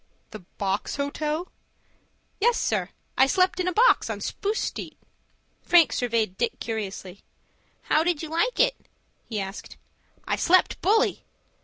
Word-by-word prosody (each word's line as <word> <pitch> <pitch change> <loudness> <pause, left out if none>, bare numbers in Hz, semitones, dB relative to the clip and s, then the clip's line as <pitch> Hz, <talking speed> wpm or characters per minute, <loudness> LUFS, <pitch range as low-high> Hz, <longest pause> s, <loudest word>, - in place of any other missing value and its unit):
"The 215 - -8 0.2
Box 195 0 -2
Hotel?" 300 +4 -3 0.9
"Yes, 475 +3 +3
sir, - - -1 0.3
I 265 - +7
slept 370 +3 +2
in 365 - 0
a - - +2
box 460 +8 +4
on - - -3
Spruce 420 +2 -3
Street." - - -5 0.6
Frank 345 -2 +5
surveyed 225 -6 -1
Dick 240 - -1
curiously. 200 -4 -5 0.6
"How 310 - +2
did 335 -2 0
you 315 - -6
like 385 +10 0
it?" - - +1 0.4
he 220 -3 -2
asked. 195 +1 -7 0.5
"I - - 0
slept 370 +1 +3
bully." 435 +4 +2
310 Hz, 140 wpm, -25 LUFS, 220-370 Hz, 0.9 s, I